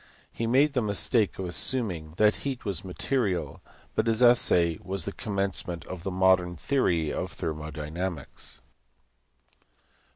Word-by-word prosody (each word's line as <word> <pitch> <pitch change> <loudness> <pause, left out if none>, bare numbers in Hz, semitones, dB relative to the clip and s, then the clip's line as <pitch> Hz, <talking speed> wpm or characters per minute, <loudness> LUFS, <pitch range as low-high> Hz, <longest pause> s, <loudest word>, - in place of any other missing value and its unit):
He 115 - -2
made 140 +5 +4
the 125 - +1
mistake 105 0 +1
of 95 - -4
assuming 90 -4 0
that 105 0 +4
heat 135 -4 -5
was 100 -5 -1
material, 95 - -2 0.3
but 110 - 0
his 115 +2 +3
essay 90 -9 +5
was 95 +1 -3
the 100 - -3
commencement 95 -5 -3
of 95 -2 -7
the 95 - -3
modern 90 -1 +3
theory 85 - 0
of - - -3
thermo 75 -1 -4
dynamics. 80 +2 -5
95 Hz, 135 wpm, -27 LUFS, 85-110 Hz, 0.3 s, essay